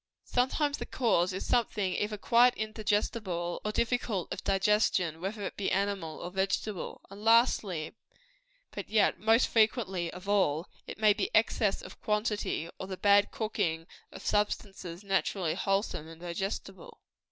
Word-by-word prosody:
Sometimes 285 +4 0
the - - -5
cause 195 -8 +2
is 185 - -4
something 210 -6 +1
either 210 +2 -2
quite 240 +4 +4
indigestible, 210 -5 -2
or 210 - -1
difficult 225 -5 -1
of - - -7
digestion, 195 -4 +2
whether 200 +3 -4
it - - -4
be 200 - -1
animal 190 -5 -1
or 175 - -5
vegetable. 195 +1 -2
And, 200 +1 -10
lastly, 220 -8 +3 0.8
but - - -7
yet 215 -1 +3
most 225 +3 +4
frequently 210 -6 +1
of 180 +2 -10
all, 185 -5 +2 0.2
it - - -7
may 215 -1 +5
be 300 - -2
excess - - +2
of - - -12
quantity, 210 -5 -1
or 190 - -5
the 190 -1 -5
bad 205 +1 +4
cooking 195 -8 -2 0.3
of 190 - -11
substances 195 -3 -2
naturally 195 -3 0
wholesome 195 -5 -1
and 165 0 -12
digestible. 195 - -5
200 Hz, 145 wpm, -30 LUFS, 185-220 Hz, 0.8 s, may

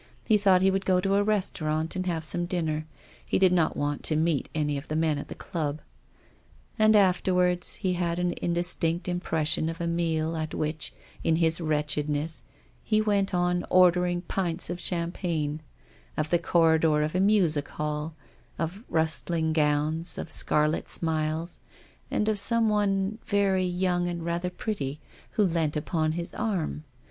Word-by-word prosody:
He 220 - +4
thought 195 -3 +4
he 195 - +5
would 195 0 -1
go 185 -1 +3
to 195 +2 0
a 200 +1 +3
restaurant 165 -6 -1
and 185 0 -2
have 165 -2 -2
some 175 +2 -1
dinner; 155 -3 -2 0.4
he - - 0
did 185 -1 +4
not 170 -3 +2
want 145 0 -1
to 155 - +5
meet 155 -2 0
any 150 -2 0
of 140 +2 -6
the 155 - -3
men 155 -2 +1
at - - -7
the - - -8
club. 155 -3 -3 1.0
And 215 0 +5
after 185 -2 +3
ward, 180 -1 +2
he 185 -1 -1
had 170 -1 -1
an 180 0 0
indistinct 175 0 -1
im 175 0 -1
pression 160 -1 0
of 165 - -6
a 170 - -2
dinner 165 -1 0
at 155 -1 -4
which 155 0 -2 0.3
in 165 - +3
his 165 +1 +1
wretch 150 -2 0
edness 150 +1 -1 0.4
he 215 - +1
went 205 -2 +1
on 175 0 +1
ordering 180 -1 +4
half - - -27
pints 175 -3 -1
of 175 - -4
champagne, 170 -4 -2 0.6
of 155 0 -1
the 175 - +4
couloir 160 -2 +3
of 155 - -2
a 185 - +1
music 185 -8 +3
hall, 150 +1 -4 0.4
of 170 +7 -4
rustling 160 0 0
gowns, 155 +2 +1
of 160 - -6
scarlet 150 +1 +1
smiles, 160 +1 -1 0.5
and 210 - 0
of 215 -2 +2
some 230 +1 +4
one, 205 0 0
very 195 -2 +2
young 180 0 0
and 170 -1 -4
rather 170 +1 -1
pretty, 150 -7 -4 0.3
who 215 - +2
leant 165 -5 0
upon 155 0 -1
his 170 +1 -4
arm. 180 -8 -2
170 Hz, 175 wpm, -27 LUFS, 155-185 Hz, 1.0 s, he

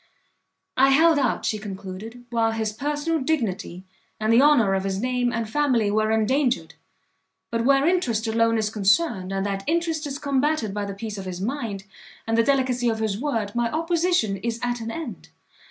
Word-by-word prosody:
"I 270 +1 +6
held 315 +3 +5
out," 255 -4 0
she 215 - -1
concluded, 205 +4 -8
"while 225 -1 +1
his 220 -1 -2
personal 295 +6 -1
dignity, 225 - -2 0.4
and 215 +1 +2
the 235 - +6
honour 275 -9 +5
of 190 0 0
his 195 0 -2
name 250 +1 0
and 230 -2 -2
family 240 -5 +1
were 215 +1 +1
endangered; 220 - +1 0.8
but 230 0 -1
where 275 +1 +4
interest 260 -11 +1
alone 230 0 +2
is 215 -1 -1
concerned, 200 - +1
and 195 0 -1
that 195 -1 -2
interest 325 -2 0
is 275 -1 -4
combated 280 -5 0
by 205 0 -2
the 200 -1 -6
peace 210 0 -6
of 190 - -7
his 180 -1 -5
mind, 220 -3 -3 0.4
and 225 - 0
the 230 - +5
delicacy 250 -1 +1
of 225 - -1
his 215 -2 -2
word, 225 -7 -2
my 240 -1 0
opposition 330 - +1
is 230 +3 -3
at 245 -1 -1
an 225 - -4
end. 280 0 -7
230 Hz, 185 wpm, -24 LUFS, 210-280 Hz, 0.8 s, I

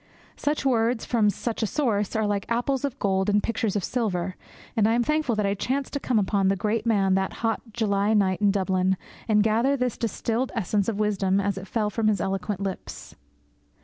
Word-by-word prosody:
Such 295 -1 -1
words 235 -2 +2
from 220 -4 +2
such 230 +3 -3
a 220 - +1
source 210 -7 0
are 220 -1 +1
like 205 -1 -1
apples 245 +3 0
of 280 -2 -2
gold 190 -2 +1
in 205 0 +4
pictures 220 -1 -1
of 205 - 0
silver, 185 -7 -1 0.4
and 215 -2 +3
I 225 - +3
am 240 - +2
thankful 300 -4 +1
that 210 -1 0
I 200 - +1
chanced 265 +7 -2
to 285 - -1
come 250 -4 0
upon 200 -1 +2
the 195 - +3
great 215 +4 -1
man 195 -4 +3
that 190 0 0
hot 225 - 0
July 210 -1 +1
night 190 -2 +2
in 205 - +4
Dublin, 190 -1 +1 0.3
and 210 -2 +4
gather 230 +6 +2
this 250 -3 -1
distilled 230 +2 -1
essence 205 -1 0
of 210 -2 -3
wisdom 195 -2 +1
as 200 -1 0
it 190 0 -7
fell 210 0 -1
from 220 +1 0
his 210 -3 +2
eloquent 195 +2 -2
lips. 195 -2 -6
210 Hz, 210 wpm, -25 LUFS, 195-230 Hz, 0.4 s, in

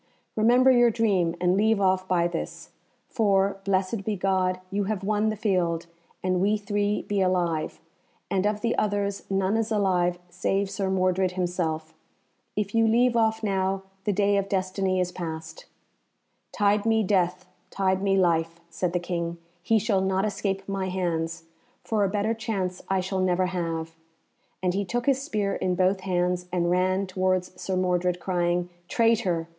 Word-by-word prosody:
"Remember 245 +4 +5
your 240 -1 +5
dream, 200 -7 +1
and 180 +1 +2
leave 220 +1 +3
off 185 -1 +2
by 175 -2 +2
this. 175 -1 -6 0.4
For, 200 -3 +2
blessed 195 +2 0
be 215 +1 -1
God, 185 -1 0
you 200 0 0
have 200 -1 -2
won 210 +2 +1
the 215 - -2
field, 180 -5 0 0.4
and 185 -1 +1
we 205 +2 +2
three 205 0 -1
be 205 -1 -1
alive, 175 -4 0 0.5
and 195 +1 +1
of 210 0 -1
the 230 +1 0
others 200 -1 -1
none 195 +1 +1
is 225 0 -1
alive 180 -4 +2
save 195 +3 -1
Sir 195 -1 -2
Mordred 185 -1 +1
himself. 165 -3 -2 0.6
If 205 -1 -2
you 225 0 +4
leave 240 +2 +3
off 220 -1 +2
now, 195 -1 0 0.2
the 210 - +2
day 200 0 +2
of 195 0 -1
destiny 185 0 0
is 180 -1 0
past." 160 -2 -7 0.8
"Tide 205 0 +2
me 225 -1 +2
death, 185 -2 +1 0.2
tide 190 -1 0
me 195 -1 +2
life," 165 -2 +1
said 175 +1 -2
the 180 - +1
King, 170 -1 -3 0.2
"he 225 +5 +2
shall 210 -2 +1
not 190 +1 +1
escape 195 -1 -2
my 195 -1 -2
hands, 165 -3 -2 0.4
for 215 -2 0
a 195 - +2
better 210 +2 0
chance 200 -5 -3
I 190 -1 +2
shall 190 +1 -2
never 185 0 +2
have;" 165 -3 -3 0.7
and 180 -1 +1
he 200 +2 0
took 240 +5 -2
his 275 -2 +2
spear 210 -8 -1
in 180 -1 -1
both 185 +1 +2
hands 180 -1 -1
and 175 -1 +1
ran 185 +2 +2
towards 185 -1 -1
Sir 190 - -2
Mordred, 180 -1 +1
crying, 175 -1 0 0.2
"Traitor! 210 -8 +1
190 Hz, 165 wpm, -26 LUFS, 180-205 Hz, 0.8 s, Remember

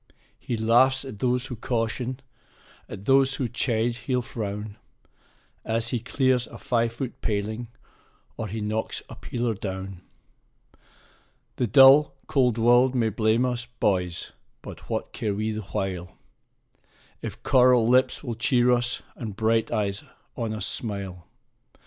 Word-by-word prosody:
He 120 - -3
laughs 130 +5 +3
at 110 -7 -8
those 125 +1 +1
who 130 -2 -6
caution, 120 +3 -2 0.7
at 95 - -8
those 135 +1 +4
who 130 - -1
chide 115 0 0
he'll 125 0 -1
frown, 105 -3 -5 0.9
As 115 +1 0
he 120 - -1
clears 125 +1 +1
a - - -11
five 115 -1 0
foot 130 +2 -6
paling, 110 +3 -2 0.7
or 110 - -4
he 110 +2 -5
knocks 110 +1 -3
a - - -9
peeler 120 -1 -2
down. 95 -2 -6 1.6
The 125 - +1
dull, 135 +6 +7
cold 125 -4 +2
world 120 +3 +4
may 115 -3 +2
blame 110 +3 +2
us, 125 -1 -2
boys! 90 -4 0 0.3
but - - -10
what - - -3
care 105 -3 -2
we 110 +2 -1
the 110 0 -4
while, 90 -2 -4 1.0
If - - -7
coral 125 -3 +5
lips 130 +4 +3
will 120 -4 -3
cheer 120 +1 +2
us, 120 +1 0
and 110 -5 -6
bright 110 +1 +1
eyes 100 -2 -1 0.3
on 115 -2 -3
us 110 0 -2
smile? 100 -5 -4
115 Hz, 140 wpm, -25 LUFS, 105-125 Hz, 1.6 s, dull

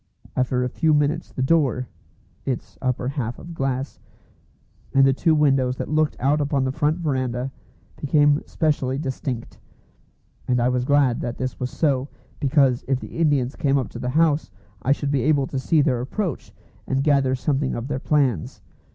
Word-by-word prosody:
After 125 0 +1
a - - 0
few 155 +4 +2
minutes 150 +3 0
the 130 - -2
door 130 -4 +2 0.6
(its 130 -3 -4
upper 125 -1 -1
half 125 -4 -3
of 170 - -9
glass), 135 -2 -3 1.0
and 135 0 +6
the 135 - +4
two 160 +4 +2
windows 135 -4 +2
that - - -4
looked 155 0 +1
out 145 +3 +2
upon 140 -2 0
the 130 - 0
front 150 +3 +1
verandah, 130 -5 -2 0.5
became 145 0 +3
specially 140 -5 0
distinct; 130 -4 -4 0.9
and 125 -1 +2
I 120 +1 +2
was 125 -1 0
glad 140 -3 +3
that 120 - -4
this 130 0 -4
was 125 -1 -2
so, 135 -3 0 0.3
because 135 -3 +3
if 135 -1 +1
the - - -8
Indians 145 -5 +2
came 140 -3 +2
up 130 - -2
to 120 - -8
the 125 0 -2
house 155 -3 +2 0.3
I 135 - +1
should 140 0 0
be 140 -3 +1
able 145 0 +2
to 135 0 -3
see 150 +4 +3
their 125 -4 +1
approach, 170 - -3 0.4
and 135 0 0
gather 140 -3 +3
something 135 0 -1
of 120 +2 -4
their 135 -2 -2
plans. 135 - 0
135 Hz, 175 wpm, -23 LUFS, 130-150 Hz, 1.0 s, and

